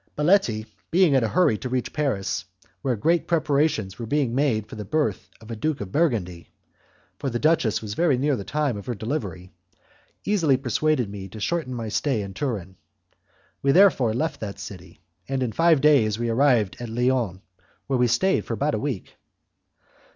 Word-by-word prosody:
Baletti, 150 - +2 0.2
being 175 -3 +4
in 130 -3 +3
a - - +2
hurry 115 -5 +2
to 130 - -5
reach 125 0 -2
Paris, 130 -12 -1 0.4
where 130 -4 0
great 165 +10 +1
preparations 145 - +1
were 115 - -5
being 140 -3 0
made 125 -6 +1
for - - -10
the 105 - -5
birth 105 - -1
of 110 +1 -11
a - - -3
Duke 155 +6 -2
of 100 -2 -6
Burgundy 100 - -1 0.7
for 140 - -2
the 120 - -2
duchess 120 -7 +2
was 105 -1 -5
near 145 -3 +2
the 100 - -5
time 140 +2 -1
of 100 - -9
her 120 - -2
delivery 100 - -4 0.7
easily 165 -10 +3
persuaded 130 0 0
me 100 -1 -7
to 110 +3 -10
shorten 140 +1 -2
my 115 -2 -4
stay 115 -1 0
in 100 -1 -7
Turin. 95 - -4 0.8
We 135 0 +3
therefore 165 - +5
left 160 +6 -2
that 100 -2 -6
city, 100 -3 -10 0.3
and 135 -1 0
in 120 - -2
five 165 +4 +3
days 130 -9 +4
we 120 0 -2
arrived 115 -4 +2
at 120 -1 -6
Lyons, 120 -5 0 0.4
where 130 -2 0
I 125 - +4
stayed 190 +12 +1
about 140 +6 0
a - - 0
week. 135 -9 -4
125 Hz, 180 wpm, -24 LUFS, 110-150 Hz, 0.8 s, therefore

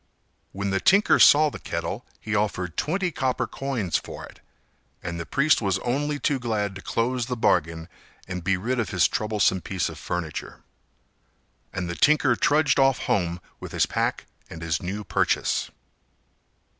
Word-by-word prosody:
When 100 0 -3
the 95 - +1
tinker 200 - +4
saw 150 +1 +7
the - - -8
kettle, - - -4
he 110 - -5
offered 95 -5 -1
twenty 180 +3 -1
copper 130 -3 -1
coins 120 - -2
for - - -9
it, - - -16 0.6
and 85 -1 -4
the 85 - -6
priest 150 0 +3
was 100 -3 +1
only 145 +4 0
too 140 -1 0
glad 105 -4 -1
to 100 - -9
close 120 +2 -1
the 125 -1 -3
bargain 85 -5 +1 0.4
and 90 -2 -5
be 95 +1 +1
rid 120 +7 -2
of 115 - -1
his 90 -5 +3
troublesome 105 -4 +1
piece 95 -1 -2
of - - -9
furniture. 85 -4 -5 1.1
And 90 - -3
the 85 - -3
tinker 140 - +4
trudged 145 +1 +3
off 135 -2 +4
home 85 -3 0 0.2
with - - -8
his - - +3
pack - - -1 0.2
and 85 0 -8
his 80 -1 -1
new 100 +4 -4
purchase. - - 0
105 Hz, 165 wpm, -25 LUFS, 90-135 Hz, 1.1 s, saw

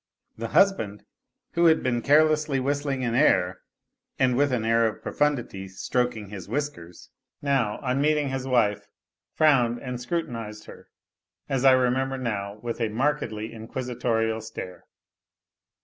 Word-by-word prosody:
The 115 +1 -4
husband, 115 - +2 0.5
who 170 0 +2
had 160 -1 +5
been 120 -2 0
carelessly 150 0 +3
whistling 140 0 -1
an 120 -2 -1
air 90 -6 +3 0.6
and 130 -1 +2
with 140 +1 +2
an 120 -3 0
air 115 0 +3
of 110 - -6
profundity 120 -10 -1
stroking 110 +2 -2
his 95 -4 -8
whiskers, 140 - -5 0.3
now, 135 -7 0
on 130 +1 0
meeting 150 -1 +2
his 135 0 -3
wife, 115 -5 +1 0.5
frowned 125 -6 +4
and 125 -2 -5
scrutinized 115 -8 -4
her, - - -13 0.6
as 135 -1 -1
I 135 -1 +7
remember 130 +1 +1
now, 105 -5 -3
with 120 0 -4
a 115 - +1
markedly 115 -3 -2
inquisitorial 115 -1 -2
stare. 90 -4 -8
125 Hz, 135 wpm, -26 LUFS, 110-140 Hz, 0.6 s, I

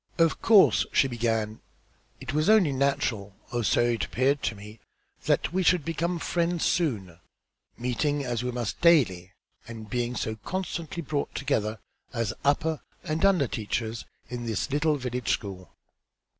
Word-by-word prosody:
"Of 165 -1 +2
course," 215 -4 +5
she 135 - +4
began, 115 -3 -1 0.6
"it 130 0 -6
was 155 +6 +2
only 210 -9 +5
natural, 130 -7 -1 0.2
or 120 -1 -1
so 110 - +3
it 120 -4 +1
appeared 135 +7 +1
to 110 - -1
me, 105 +2 -11 0.5
that - - +1
we 190 - +1
should 175 -3 +3
become 170 +2 -1
friends 170 0 0
soon, 100 - -1 0.6
meeting, 140 +4 -1
as 120 -2 -2
we 125 - -1
must, 120 -4 -4
daily, 110 - +3 0.3
and 110 -2 -9
being 120 0 -1
so 110 -2 -3
constantly 175 - -4
brought 145 0 -3
together, 110 -6 -1 0.4
as 115 -3 -1
upper 150 +2 +1 0.2
and 155 +3 -2
under 185 -9 +4
teachers 110 +1 -3 0.2
in 120 0 -5
this 110 +3 -2
little 150 +2 +2
village 125 -2 -3
school. 95 -3 -3
125 Hz, 150 wpm, -27 LUFS, 110-155 Hz, 0.6 s, course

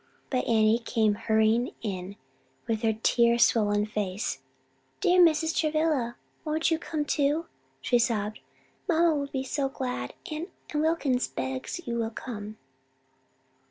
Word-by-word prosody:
But 255 -2 0
Annie 220 0 +4
came 225 -3 +1
hurrying 220 +3 +1
in 190 -2 -4 0.5
with 220 -1 -1
her 225 -2 +2
tear 235 0 +4
swollen 210 -3 +3
face. 210 -1 -3 0.6
"Dear 365 -2 +4
Mrs. 320 -1 +4
Travilla, 310 -6 +1 0.3
won't 315 +1 0
you 320 - +2
come 310 -3 -3
too?" 295 +3 +1 0.4
she 245 - +2
sobbed. 215 -3 0 0.5
"Mamma 335 -1 +4
will 285 -2 -1
be 265 -1 -3
so 270 +1 -1
glad; 250 - -4 0.2
and 310 +3 -4 0.2
and 300 - 0
Wilkins 305 -6 +1
begs 130 - -4
you 235 -2 -2
will 225 -1 0
come." 215 -2 -7
240 Hz, 135 wpm, -28 LUFS, 215-305 Hz, 0.6 s, Annie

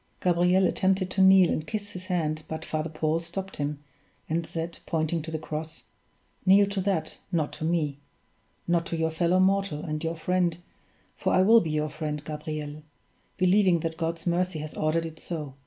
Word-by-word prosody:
Gabriel 180 +1 +3
attempted 185 +1 +1
to 195 - +1
kneel 190 -2 +7
and 155 - -2
kiss 205 -2 -4
his 185 -2 -8
hand 160 -5 -1
but 160 0 -5
Father 155 +1 -2
Paul 155 +1 0
stopped 185 +3 -6
him, 145 0 -3 0.4
and 165 +1 -1
said, 165 0 -5
pointing 160 0 0
to 160 - -7
the 160 - -2
cross: 155 +1 -6 0.6
"Kneel 195 +2 +6
to 200 -1 -1
that 180 -5 -1
not 160 -4 0
to - - -7
me; 155 -4 0 0.7
not 170 -1 +1
to 165 - -3
your 160 0 0
fellow 170 +3 +2
mortal, 190 -5 +2
and 155 0 -3
your 165 +1 -1
friend 175 0 0 0.6
for - - -1
I 185 - +5
will 225 +3 +7
be 160 - -3
your 155 0 0
friend, 150 -1 -4
Gabriel; 150 -1 -5 0.6
believing 185 -2 +4
that 160 0 -2
God's 165 +1 -3
mercy 180 0 0
has 155 0 -6
ordered 160 +2 0
it 160 -1 -8
so. 150 -5 -5
165 Hz, 185 wpm, -27 LUFS, 155-185 Hz, 0.7 s, kneel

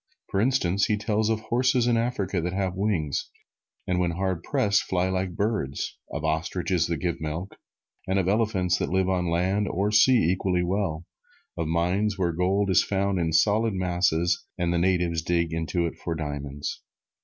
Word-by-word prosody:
For 100 - +1
instance, 100 -6 +2
he 105 - +1
tells 105 +1 0
of 110 -1 0
horses 125 +2 +2
in 120 -1 +3
Africa 105 -6 -1
that 90 +2 -2
have 95 -1 -1
wings, 95 -7 -1 0.6
and 90 0 0
when 90 -1 +1
hard 90 0 -2
pressed, 100 +3 +1
fly 90 0 0
like 95 -1 -2
birds; 100 -10 -2 0.2
of 80 - -4
ostriches 85 +3 0
that 85 -1 -1
give 85 -3 -2
milk, 80 +5 -4 0.5
and 95 +1 +1
of 95 -2 +1
elephants 100 -4 +1
that - - -1
live 95 +1 +1
on 90 -2 0
land 95 +5 +1
or 100 +3 0
sea 110 -4 +5
equally 90 -1 0
well; 90 -3 -1 0.5
of 85 - -2
mines 90 +5 0
where 90 -3 +1
gold 95 +4 +1
is 90 - +5
found 100 -1 0
in 80 -1 0
solid 105 +5 +3
masses 90 -1 +1
and 85 -1 0
the 85 - +1
natives 85 -2 +1
dig 85 0 0
into 80 +1 -1
it 85 - -4
for 85 - -3
diamonds. 70 -2 -5
90 Hz, 180 wpm, -26 LUFS, 85-100 Hz, 0.6 s, sea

